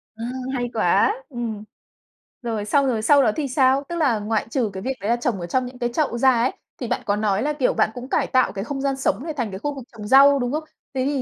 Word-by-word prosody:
Ơ, 225 Hz, -, -7 dB, 0.3 s
hay 245 Hz, -1 st, -2 dB
quá! 420 Hz, -, +3 dB
Ừm. 230 Hz, -5 st, -5 dB, 0.8 s
Rồi, 225 Hz, -4 st, -3 dB
xong 275 Hz, +6 st, +2 dB
rồi 235 Hz, -4 st, 0 dB
sau 285 Hz, +5 st, +5 dB
đó 215 Hz, -, +3 dB
thì 295 Hz, -3 st, -2 dB
sao? 265 Hz, +1 st, +3 dB
Tức 345 Hz, -, -3 dB
là 275 Hz, -10 st, +2 dB
ngoại 215 Hz, +1 st, -1 dB
trừ 240 Hz, -4 st, 0 dB
cái 190 Hz, -, -6 dB
việc 265 Hz, -, -1 dB
đấy 205 Hz, -, -2 dB
là 235 Hz, -, +4 dB
trồng 240 Hz, -4 st, -2 dB
ở 175 Hz, -, -4 dB
trong 255 Hz, +8 st, 0 dB
những 250 Hz, 0 st, -10 dB
cái 240 Hz, -, 0 dB
chậu 285 Hz, -5 st, 0 dB
ra 260 Hz, +1 st, +5 dB
ấy, 240 Hz, +1 st, +1 dB, 0.3 s
thì 245 Hz, -, -5 dB
bạn -, -, -1 dB
có 205 Hz, -, +1 dB
nói 210 Hz, -1 st, 0 dB
là, 300 Hz, +1 st, 0 dB
kiểu, 275 Hz, -4 st, +1 dB
bạn 215 Hz, -, +2 dB
cũng 250 Hz, +2 st, -8 dB
cải -, -, +1 dB
tạo 255 Hz, -1 st, +2 dB
cái 195 Hz, -1 st, -4 dB
không 270 Hz, +4 st, -4 dB
gian 275 Hz, -1 st, 0 dB
sống 255 Hz, -2 st, 0 dB
này, 320 Hz, -, -4 dB
thành 245 Hz, -7 st, -2 dB
cái 190 Hz, -, -6 dB
khu 290 Hz, +4 st, -3 dB
vực 270 Hz, -, -7 dB
trồng 210 Hz, -2 st, -8 dB
rau, 275 Hz, +3 st, +7 dB
đúng 245 Hz, -1 st, -1 dB
không? 305 Hz, +2 st, -2 dB, 0.3 s
Thế 260 Hz, 0 st, -1 dB
thì 280 Hz, -1 st, 0 dB
250 Hz, 280 wpm, -22 LUFS, 220-275 Hz, 0.8 s, rau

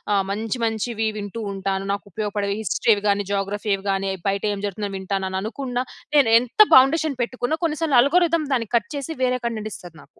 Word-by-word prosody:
ఆహ్, 195 Hz, -1 st, +1 dB
మంచి, 225 Hz, +4 st, -3 dB
మంచివి 225 Hz, 0 st, -1 dB
వింటూ 205 Hz, +2 st, -6 dB
ఉంటాను. 195 Hz, 0 st, -2 dB
నాకు 200 Hz, -, -5 dB
ఉపయోగపడే 205 Hz, -1 st, -2 dB
హిస్టరీవి 210 Hz, +2 st, +2 dB
గాని 200 Hz, 0 st, +1 dB
జియోగ్రఫీవి 200 Hz, 0 st, -1 dB
గాని 195 Hz, 0 st, -1 dB, 0.2 s
బయట 200 Hz, +1 st, -2 dB
ఏం 200 Hz, -, -5 dB
జరుగుతుందో 205 Hz, 0 st, -4 dB
వింటాను. 190 Hz, 0 st, -2 dB
అని 190 Hz, -, -2 dB
అనుకున్నా 250 Hz, +3 st, -3 dB, 0.3 s
నేను 275 Hz, -6 st, +5 dB
ఎంత 250 Hz, -, -10 dB, 0.2 s
బౌండేషన్ 275 Hz, +1 st, +4 dB
పెట్టుకున్న 255 Hz, +5 st, -2 dB
కొన్ని 315 Hz, -2 st, 0 dB
సార్లు 285 Hz, -6 st, +3 dB
ఆల్గోరిథం 335 Hz, +2 st, +2 dB
దాన్ని 230 Hz, -5 st, -1 dB
కట్ 230 Hz, +4 st, 0 dB
చేసి 280 Hz, +4 st, -4 dB
వేరే 250 Hz, 0 st, +1 dB
కంటెంట్ 215 Hz, -2 st, -3 dB
ఇస్తది 175 Hz, -3 st, -11 dB
నాకు. -, -, -23 dB
220 Hz, 185 wpm, -22 LUFS, 200-255 Hz, 0.3 s, నేను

